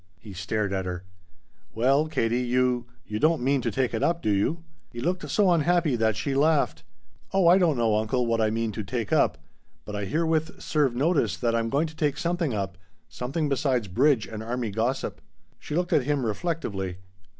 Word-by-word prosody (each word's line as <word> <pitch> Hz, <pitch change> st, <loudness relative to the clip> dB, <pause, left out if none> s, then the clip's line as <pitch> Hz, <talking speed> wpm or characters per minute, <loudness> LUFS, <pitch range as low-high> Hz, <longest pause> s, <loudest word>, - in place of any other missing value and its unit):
He 100 Hz, +5 st, -11 dB
stared 100 Hz, +2 st, -2 dB
at 95 Hz, -1 st, -2 dB
her. 90 Hz, 0 st, -4 dB, 0.7 s
"Well, 135 Hz, +7 st, +3 dB
Katie, 120 Hz, -5 st, 0 dB
you 125 Hz, -1 st, +1 dB, 0.2 s
you 105 Hz, 0 st, -4 dB
don't 155 Hz, -2 st, +2 dB
mean 135 Hz, +1 st, +2 dB
to -, -, -1 dB
take 130 Hz, -3 st, -1 dB
it 110 Hz, -, -1 dB
up, 170 Hz, 0 st, +1 dB
do 105 Hz, -, +2 dB
you?" 135 Hz, +12 st, 0 dB, 0.3 s
He 120 Hz, -, -8 dB
looked 180 Hz, +8 st, -2 dB
so 200 Hz, -4 st, +3 dB
unhappy 170 Hz, -3 st, +2 dB
that 110 Hz, -2 st, +1 dB
she 105 Hz, +6 st, -2 dB
laughed. 150 Hz, +2 st, +2 dB, 0.5 s
"Oh 190 Hz, -3 st, +4 dB
I 180 Hz, +3 st, +7 dB
don't 165 Hz, -7 st, +2 dB
know, 115 Hz, -2 st, +2 dB
uncle, 110 Hz, +4 st, 0 dB
what 115 Hz, -1 st, +1 dB
I 110 Hz, -, +3 dB
mean 115 Hz, 0 st, -1 dB
to 105 Hz, +1 st, -5 dB
'take 115 Hz, -1 st, -3 dB
up,' -, -, +3 dB, 0.5 s
but 105 Hz, -, -6 dB
I 105 Hz, -1 st, -2 dB
herewith 160 Hz, -, 0 dB
serve 145 Hz, -6 st, +1 dB
notice 135 Hz, -, +1 dB
that 115 Hz, +7 st, 0 dB
I'm 115 Hz, 0 st, 0 dB
going 140 Hz, +6 st, +1 dB
to 160 Hz, 0 st, -8 dB
take 150 Hz, -2 st, 0 dB
something 170 Hz, -3 st, -1 dB
up 95 Hz, -4 st, -3 dB, 0.3 s
something 145 Hz, +5 st, -2 dB
besides 130 Hz, -5 st, 0 dB
bridge 125 Hz, +4 st, +2 dB
and 110 Hz, -1 st, -7 dB
army 115 Hz, -1 st, -3 dB
gossip." 115 Hz, +6 st, -2 dB, 0.4 s
She 150 Hz, -, -5 dB
looked 175 Hz, +1 st, 0 dB
at 145 Hz, -6 st, +3 dB
him 145 Hz, -3 st, 0 dB
reflectively. 105 Hz, -, -3 dB
125 Hz, 195 wpm, -26 LUFS, 110-155 Hz, 0.7 s, I